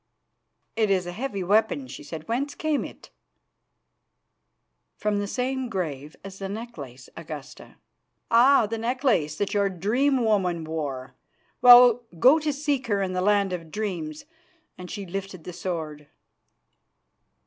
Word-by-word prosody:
"It 220 -2 +1
is 185 -2 +2
a 175 - -5
heavy 205 -1 -4
weapon," 220 +8 +1
she - - -9
said. 160 -1 -8
"Whence 275 +5 -2
came 310 -2 -1
it?" - - -11 1.9
"From 210 -1 0
the 205 - -2
same 255 +3 -2
grave 155 -8 -4
as 195 0 -10
the 195 -1 -5
necklace, 150 - -8
Augusta." 155 -3 -9 0.6
"Ah! 240 +1 +6
the 225 +2 -4
necklace 230 - 0
that 200 +5 -2
your 200 -1 +2
dream 240 +8 +1
woman 180 -6 +1
wore. 145 -5 -5 0.5
Well, 245 -1 +9 0.2
go 265 - +6
to 305 -1 -1
seek 280 -3 -2
her 200 -3 +1
in 185 -1 -3
the 185 - -1
land 200 -1 +2
of 165 -2 -6
dreams," 170 -7 -4 0.5
and 180 -1 -10
she 200 -2 -6
lifted 190 -1 -6
the 180 - -8
sword. 160 -4 -5
200 Hz, 140 wpm, -25 LUFS, 170-245 Hz, 1.9 s, Well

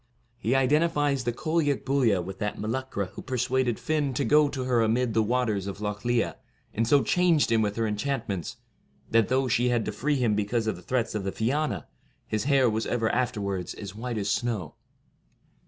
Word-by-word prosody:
He 120 +2 +1
identifies 145 -1 +2
the 120 - +1
Cailleac 150 +2 0
Buillia 125 -9 +2
with 95 +2 -8
that 105 -1 -2
Meluchra 110 -3 -3
who - - -7
persuaded 125 -1 0
Fionn 150 -4 -1
to 140 - 0
go 150 +4 +5
to 135 -2 -4
her 125 -2 +2
amid 115 +1 +1
the 110 - +3
waters 110 -4 0
of 100 0 -5
Lough 105 -1 -3
Liath, 120 -1 0 0.4
and 115 +1 0
so 140 +3 +4
changed 175 -7 +3
him 115 -1 +4
with 105 -1 0
her 115 - 0
enchant 115 +4 -2
ments, 95 -5 -4 0.5
that, 115 -2 +4
though 130 +1 +1
she 120 +1 +2
had 120 -2 +1
to - - -2
free 145 +8 0
him 120 -5 +2
because 105 +2 0
of 110 - -1
the 90 - -12
threats 120 +4 -1
of 105 -2 -2
the 95 - -2
Fiana, 115 - -1 0.4
his 110 +1 -2
hair 135 -3 +4
was 110 0 -1
ever 115 -2 0
afterwards 100 -7 -2
as 100 -2 -7
white 115 +2 -4
as 100 -1 -1
snow. 105 -9 -2
120 Hz, 200 wpm, -27 LUFS, 105-130 Hz, 0.5 s, go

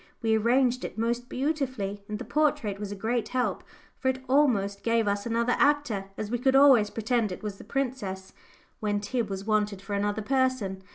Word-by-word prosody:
We 220 -1 +3
arranged 250 +3 +2
it - - -6
most 235 +2 -1
beautifully, 260 -8 -2
and 210 - -3
the 250 - -7
portrait 235 -6 0
was 205 -1 -5
a - - -4
great 225 +3 -1
help, 250 -1 -1 0.4
for 260 - -2
it 260 0 0
almost 230 -8 +2
gave 230 -2 +1
us 200 +2 -1
another 235 +1 +1
actor, 290 -9 +2
as 215 0 -4
we 240 - 0
could 265 +2 +2
always 265 -7 +6
pretend 225 -1 0
it 180 - -7
was 205 -2 -5
the - - -10
princess, 240 -9 -3 0.5
when 205 -1 0
Tib 215 +1 -2
was 195 0 -5
wanted 210 -2 +1
for 195 +2 -7
another 205 +1 -1
person. 255 -7 0
225 Hz, 190 wpm, -27 LUFS, 205-255 Hz, 0.5 s, always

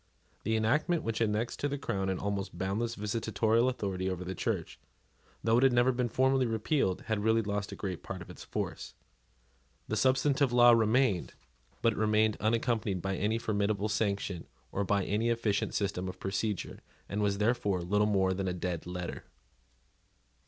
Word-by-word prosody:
The 110 +2 0
enactment 150 +10 +1
which 115 0 -2
annexed 110 +2 0
to 145 - 0
the 145 0 -2
crown 95 -8 -2
an 95 - 0
almost 100 -2 -3
boundless 105 +6 -1
visitatorial 110 +2 +1
authority 95 -6 -2
over 90 -1 -3
the 95 - -3
Church, - - -3 0.6
though 115 +1 +3
it - - +2
had 135 -2 +5
never 120 +2 +4
been 125 -1 -1
formally 130 +2 +2
repealed, 110 - 0
had 110 -2 -2
really 110 +1 +3
lost 100 -1 -3
a - - -5
great 95 -4 -4
part 95 -2 -6
of 90 - -16
its - - -11
force. - - -5 0.9
The 110 - -1
substantive 135 +3 +3
law 120 0 +7
remained; 115 -3 +2 0.5
but 115 - +4
it - - -6
remained 110 0 +3
unaccompanied 110 -2 0
by 95 +2 -2
any 105 +4 0
formidable 105 -2 0
sanction 100 -4 -1 0.2
or 100 - -1
by 100 -1 +1
any 110 +3 0
efficient 115 -3 0
system 95 -2 -1
of 90 0 -9
procedure, 100 +1 -2 0.3
and 105 +1 -2
was 100 -1 +1
therefore 105 -4 +1
little 105 +4 +2
more 95 -2 +2
than 95 0 -2
a 90 - 0
dead 90 -2 -3
letter. 90 -1 -5
105 Hz, 175 wpm, -31 LUFS, 95-115 Hz, 0.9 s, law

